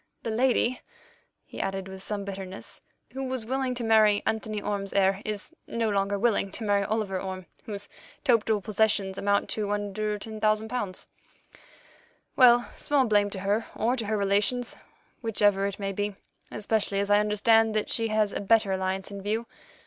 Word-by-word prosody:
The 225 - -2
lady," 245 +1 +2 0.6
he - - -6
added 195 0 -3
with 190 0 -8
some 200 0 -4
bitterness, 195 -1 -6 0.3
"who 270 +1 -4
was 260 -3 -3
willing 260 +1 -1
to 240 - -3
marry 215 -2 +4
Anthony 220 -1 -1
Orme's 200 -1 -3
heir 195 0 +3
is 210 -1 -4
no 230 -1 -1
longer 200 0 +1
willing 210 -2 +1
to 230 - -5
marry 205 -1 +2
Oliver 200 -2 -1
Orme, 185 -1 -5 0.2
whose 205 -3 -5 0.4
total 225 -5 +3
possessions 205 -2 +1
amount 200 0 +1
to 210 -2 -1
under 205 +1 -2
£10,000. 215 -1 -2 1.3
Well, 240 -1 +6
small 285 -3 +2
blame 205 -2 +3
to 195 -2 -5
her 205 +3 0
or 235 +3 +1
to 230 -5 -3
her 215 0 0
relations, 205 +5 +1 0.5
whichever 205 -3 +2
it 200 - -5
may 195 -1 -3
be, 205 +1 -2 0.3
especially 210 -1 -1
as 200 0 0
I 205 - +6
understand 220 +1 +3
that 215 - 0
she 230 -1 +1
has 215 -2 +1
a - - -2
better 210 -1 +3
alliance 190 +1 -2
in 200 -1 -6
view. 220 +4 -1
210 Hz, 165 wpm, -27 LUFS, 200-225 Hz, 1.3 s, Well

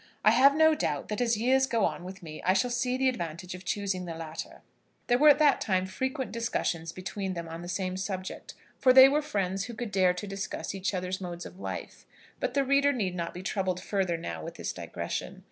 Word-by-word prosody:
I - - +8
have 275 +2 +6
no 315 0 +6
doubt 145 - -2
that 210 +2 -2
as 235 -2 +2
years 260 +4 +3
go 230 -5 +2
on - - -3
with 185 0 -9
me 155 -2 -8
I 185 - +3
shall 245 +6 +1
see 250 +1 0
the 265 0 +2
advantage 175 -6 -3
of 180 0 -9
choosing 195 -2 -2
the 165 -1 -5
latter." 160 -1 -7 0.4
There 245 +1 +2
were 300 +1 +8
at 290 - +7
that 295 -2 +4
time 185 -2 +1
frequent 260 +7 -3
discussions 175 -8 -2
between 185 +2 -4
them 170 -1 -5
on 165 +1 -7
the 175 - -7
same 185 0 -2
subject, 190 -1 -5 0.2
for 255 -1 +6
they 260 +1 +10
were 290 +2 +2
friends 195 -8 -2
who 240 - -7
could 235 -2 -5
dare 185 -2 +3
to 180 - -5
discuss 195 -1 -4
each 195 0 -2
other's 185 +1 -3
modes 175 -1 -6
of 185 - -11
life; - - -7 0.3
but - - -2
the 280 - +3
reader 280 +1 +4
need 205 -9 -1
not 170 -2 -3
be 180 - -8
troubled 185 -2 -1
further 185 -4 -1
now 85 - -6
with - - -7
this - - -4
digression. - - -5
195 Hz, 230 wpm, -29 LUFS, 180-250 Hz, 0.4 s, they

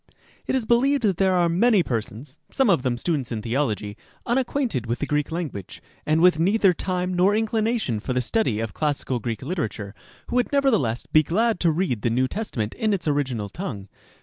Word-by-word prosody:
It - - 0
is 255 -4 0
believed 260 +4 +2
that 195 -5 +2
there 190 -1 +3
are 175 -1 +3
many 195 +3 +3
persons 125 +4 -5
(some 265 -6 +2
of 170 - +3
them 125 -2 -1
students 140 -3 -2
in 110 -2 -3
theology) 115 -5 -1 0.3
unacquainted 245 - -1
with 120 +2 -1
the - - -2
Greek 150 +1 -1
language, 155 - -5 0.3
and 155 +1 +3
with 180 -2 +5
neither 195 +2 +4
time 180 +1 -2
nor 185 +3 +3
inclination 220 - 0
for 120 - -5
the 125 - +1
study 125 - 0
of 115 -2 -4
classical 145 -4 -1
Greek 115 0 -4
literature, 120 - -4 0.4
who 245 - 0
would 245 - +1
nevertheless 220 - +1
be 155 - +4
glad 215 +7 +1
to 170 - +3
read 155 - -1
the 120 - +1
New 125 +3 +1
Testament 125 - -3
in 215 -1 0
its 185 -5 -3
original 130 -8 -1
tongue. 105 - -6
160 Hz, 195 wpm, -24 LUFS, -, 0.4 s, with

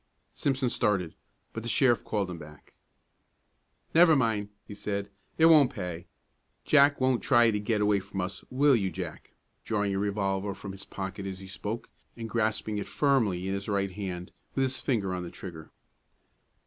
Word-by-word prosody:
Simpson 135 -2 0
started, 100 -8 0 0.4
but 115 - -4
the 120 - -4
sheriff 120 +2 +3
called 105 -3 -1
him 85 - -7
back. 75 -1 -14 1.2
"Never 165 -1 +7
mind," 110 -6 +1 0.2
he - - -8
said, 100 -1 -4 0.3
"it 160 - +6
won't 155 -5 +7
pay; 90 -2 -6 0.6
Jack 140 -1 +5
won't 130 -2 +2
try 120 -3 +5
to 105 - -1
get 105 0 0
away 105 -1 +3
from 95 0 -7
us, 90 +1 -4
will 140 +1 +4
you, 100 -5 0
Jack?" 90 -4 -7 0.3
drawing 105 -2 0
a 95 - 0
revolver 100 -1 -1
from 100 0 -7
his 95 +1 -8
pocket 95 0 -5
as 95 -1 -5
he 95 - -10
spoke, 105 +4 -5 0.3
and 115 -1 -5
grasping 110 -2 0
it - - -5
firmly 110 -11 +1
in 95 - -1
his 100 +1 -4
right 100 -1 0
hand, 90 -2 -5 0.2
with 135 - +2
his 130 0 -1
finger 100 -8 0
on 90 - -3
the 90 - -6
trigger. 85 -5 -9
105 Hz, 175 wpm, -29 LUFS, 95-120 Hz, 1.2 s, Never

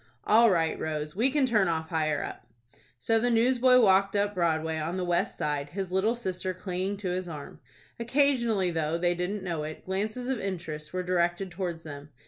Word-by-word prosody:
"All 230 +2 +6
right, 165 -4 +1
Rose. 150 0 -3
We 235 +7 +3
can 280 0 +2
turn 215 -6 +2
off 160 -1 -2
higher 155 -3 0
up." 120 - -8 0.5
So 225 - +2
the 245 +2 +1
newsboy 250 +2 +4
walked 195 -1 +4
up 205 0 +1
Broadway, 160 -3 0
on 165 +4 -3
the 185 - -1
west 175 -1 0
side, 145 -1 -2
his 190 +2 -4
little 200 +5 +2
sister 185 -5 -3
clinging 185 +2 -3
to 195 -2 -4
his 180 0 -3
arm. 150 -3 -8 0.4
Occasionally, 235 -6 +2
though 160 0 -1
they 175 +1 +1
didn't 185 +3 -3
know 170 -4 -2
it, 155 +1 -7
glances 215 +6 -3
of 265 -3 -1
interest 165 -6 -5
were 185 0 -2
directed 180 +1 0
towards 175 -2 -4
them. 145 -1 -9
185 Hz, 190 wpm, -28 LUFS, 160-210 Hz, 0.5 s, All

